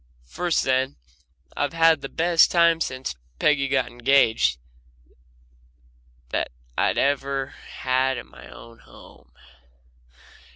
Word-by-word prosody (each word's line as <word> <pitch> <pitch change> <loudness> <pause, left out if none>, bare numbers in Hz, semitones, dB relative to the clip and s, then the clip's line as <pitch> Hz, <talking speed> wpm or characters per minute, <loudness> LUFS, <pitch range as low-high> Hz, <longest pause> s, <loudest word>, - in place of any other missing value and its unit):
First 170 - -1
then, 130 0 0 0.6
I've 145 +2 -2
had 165 -2 +4
the 135 - -6
best 170 0 +3
time 170 -1 +3
since 130 -2 -3 0.2
Peggy 140 - +2
got 135 -2 +1
engaged 120 - +2 1.7
that - - -2 0.3
I've - - +1
ever 140 -1 0 0.3
had 130 0 0
in 120 - -7
my - - -14
own 115 0 -14
home. - - -18
135 Hz, 110 wpm, -23 LUFS, 130-160 Hz, 1.7 s, had